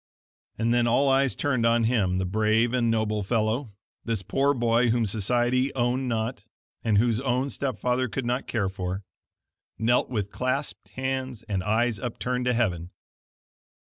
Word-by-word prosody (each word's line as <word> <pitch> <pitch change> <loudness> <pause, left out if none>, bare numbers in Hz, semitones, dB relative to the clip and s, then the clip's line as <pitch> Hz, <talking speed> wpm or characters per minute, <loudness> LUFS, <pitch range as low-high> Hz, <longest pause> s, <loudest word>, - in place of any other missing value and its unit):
And 115 +1 +1
then 120 -1 +3
all 135 +4 +3
eyes 135 0 +3
turned 130 -5 0
on 115 0 +3
him, 105 -6 +1
the 95 - 0
brave 110 +4 +2
and 120 -2 +2
noble 110 -2 0
fellow 110 +4 0 0.3
this 115 -4 -2
poor 140 +8 +1
boy 120 0 +2
whom 115 0 +2
society 120 +5 +1
owned 125 +1 0
not, 115 0 -2 0.4
and 110 -3 +2
whose 115 +1 +2
own 130 +1 0
step 130 -6 -3
father 125 +2 0
could 130 +3 -3
not 125 +2 -1
care 110 -5 0
for 95 +1 -4 0.7
knelt 120 +2 +2
with 105 -5 -2
clasped 130 +3 -2
hands 130 -3 -3
and 100 -4 -2
eyes 110 +1 +1
upturned 125 +3 -3
to 125 - +2
heaven. 90 -8 0
120 Hz, 160 wpm, -26 LUFS, 110-125 Hz, 0.7 s, then